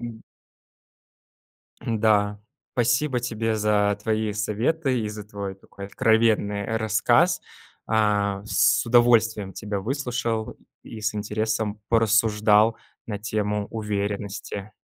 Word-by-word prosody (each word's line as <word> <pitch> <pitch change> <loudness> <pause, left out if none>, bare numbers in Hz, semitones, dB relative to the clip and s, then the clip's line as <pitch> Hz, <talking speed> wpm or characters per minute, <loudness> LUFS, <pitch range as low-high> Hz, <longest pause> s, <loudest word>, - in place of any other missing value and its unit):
М. 115 -2 -8 1.6
М-да. 105 -2 +1 0.3
Спасибо 125 +2 +1
тебе 115 -2 -2
за 105 -1 +2
твои 110 -1 0
советы 125 +6 0
и 105 - -3
за 105 -1 -7
твой 100 -2 -6
такой 100 +1 -11
откровенный, 110 -1 +2
э, 110 +2 -2
рассказ. 110 -1 +2 0.5
А, 105 -2 +1
с - - +3
удовольствием 115 -4 +3
тебя 105 -2 -4
выслушал 120 -2 -2 0.3
и 110 - -9
с 105 0 -1
интересом 110 0 -2
порассуждал 110 -1 +3 0.3
на 105 -3 -4
тему 105 -2 -2
уверенности. 100 -1 -4
110 Hz, 105 wpm, -24 LUFS, 105-115 Hz, 1.6 s, с